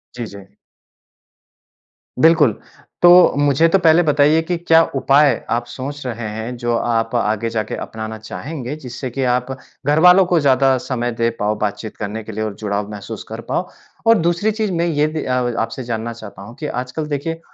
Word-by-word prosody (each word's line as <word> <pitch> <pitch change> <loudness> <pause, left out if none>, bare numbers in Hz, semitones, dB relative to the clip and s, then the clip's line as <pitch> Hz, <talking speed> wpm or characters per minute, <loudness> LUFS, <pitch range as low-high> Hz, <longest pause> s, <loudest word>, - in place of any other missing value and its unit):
जी, 120 - -4
जी। 100 -1 -13 1.7
बिल्कुल। 160 -8 +4 0.4
तो 175 - +8 0.3
मुझे 145 +2 +3
तो 195 - +4
पहले 165 0 +5
बताइए 150 +1 +3
कि 175 +2 -2
क्या 165 -1 +4
उपाय 140 +1 +4 0.2
आप 120 +1 0
सोच 140 +3 -7
रहे 120 -2 -4
हैं 115 +3 -5
जो 120 -1 -1
आप 115 0 -1
आगे 110 0 0
जाके 110 -1 -3
अपनाना 110 0 -6
चाहेंगे, 125 - -6
जिससे 130 -2 -7
की 135 +3 -3
आप 125 +1 -2 0.4
घरवालों 180 +5 +6
को 175 -1 +2
ज़्यादा 135 -2 +3
समय 120 -1 -3
दे 115 0 0
पाओ 105 +1 0
बातचीत 105 +1 -4
करने 110 +1 -5
के 110 - -8
लिए 110 +1 -3
और 105 -2 -4
जुड़ाव 105 -1 -3
महसूस 105 -2 -7
कर - - -6
पाओ। - - -1 0.4
और 230 0 +6
दूसरी 175 +5 +1
चीज़ 215 -1 -2
मैं 170 -1 0
ये 150 -3 +1
भी 155 0 -4
अ 130 - -1 0.3
आपसे 115 +3 -3
जानना 115 -1 -4
चाहता 110 -4 -11
हूँ 105 +5 -11
कि 150 - -5
आजकल 125 +4 -4
देखिए, 155 +3 -3
130 Hz, 180 wpm, -19 LUFS, 110-155 Hz, 1.7 s, तो